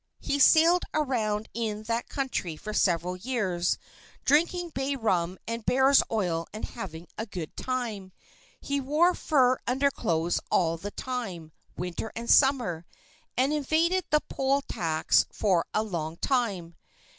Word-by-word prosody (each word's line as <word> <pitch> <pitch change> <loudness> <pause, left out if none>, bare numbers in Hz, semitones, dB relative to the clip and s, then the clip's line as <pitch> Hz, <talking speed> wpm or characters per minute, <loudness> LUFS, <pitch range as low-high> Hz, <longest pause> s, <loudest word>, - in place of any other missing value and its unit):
He 285 - -1
sailed 330 +5 +6
around 220 -8 0
in 215 -2 -3
that 230 +2 -2
country 250 - -3
for 215 +5 -6
several 180 -2 +1
years, 185 -6 -1 0.5
drinking 340 +4 +2
bay 275 -2 -2
rum 185 -7 0
and 230 0 -3
bear's 265 +3 +5
oil 175 -7 -1
and 215 - -5
having 175 -7 -8
a 220 - -3
good 175 -6 -7
time. 230 -7 -3 0.5
He 280 0 -2
wore 305 +7 +3
fur 260 -7 +2
underclothes 235 - +1
all 165 -2 +2
the 200 +5 -6
time, 200 -10 -5 0.3
winter 180 +5 -4
and 235 +1 -5
summer, 240 - +3 0.5
and 265 +4 +2
evaded 325 +5 +1
the 300 -1 +3
poll 275 +1 0
tax 160 - +1
for 185 -6 +1
a 215 - +1
long 165 -6 -4
time. 195 -11 -1
230 Hz, 135 wpm, -27 LUFS, 180-270 Hz, 0.5 s, sailed